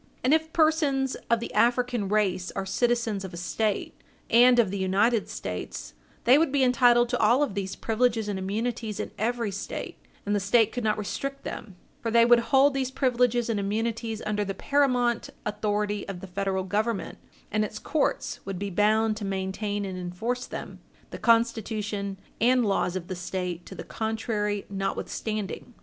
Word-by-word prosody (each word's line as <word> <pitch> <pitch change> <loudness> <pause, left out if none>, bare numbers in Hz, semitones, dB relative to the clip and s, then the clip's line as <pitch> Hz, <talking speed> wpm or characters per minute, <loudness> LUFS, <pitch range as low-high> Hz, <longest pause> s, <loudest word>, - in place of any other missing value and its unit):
And 260 +4 +4
if 320 0 +1
persons 300 -5 +2 0.2
of 235 - +3
the 235 - -6
African 240 -3 +2
race 190 -4 +1
are 195 - -2
citizens 230 0 0
of 185 -2 -7
a - - -7
State, 205 +4 -1 0.4
and 245 +1 +7
of 220 -6 +3
the 200 - -3
United 200 +4 +2
States, 90 -8 -6 0.3
they 255 +5 +6
would 325 -3 +2
be 280 -1 +3
entitled 245 -1 +5
to - - -1
all 240 +6 +4
of 280 - -2
these 195 -1 -3
privileges 225 -1 0
and 200 -2 -2
immunities 220 +2 -3
in - - -4
every 230 0 0
State, 200 +2 -5 0.3
and 205 +1 +1
the - - +2
State 220 +3 +3
could 245 - -4
not 215 -1 +1
restrict 275 +7 -4
them, 195 - -7 0.3
for 230 - -2
they 230 +1 +5
would 240 0 +6
hold 275 0 +5
these 265 -2 -1
privileges 250 -3 +1
and 225 -3 0
immunities 225 +2 -2
under 210 0 0
the 195 -1 -4
paramount 250 -5 +1 0.2
authority 210 -1 -1
of 195 -2 -5
the 190 - -8
Federal 190 0 -2
Government, 205 0 -2 0.3
and 215 +1 +1
its 215 0 -5
courts 310 - -1
would 195 -1 -5
be 200 +1 -4
bound 215 +3 +3
to 215 - -6
maintain 195 +1 -2
and 185 -1 -5
enforce 220 +8 -3
them, - - -7 0.3
the - - -7
Constitution 215 -4 +1 0.2
and 245 +1 +4
laws 195 -3 0
of 180 -2 -4
the 185 - -4
State 180 -1 -4
to - - -9
the - - -7
contrary 220 -2 -2
notwithstanding. 205 +3 -4
215 Hz, 175 wpm, -27 LUFS, 195-240 Hz, 0.4 s, and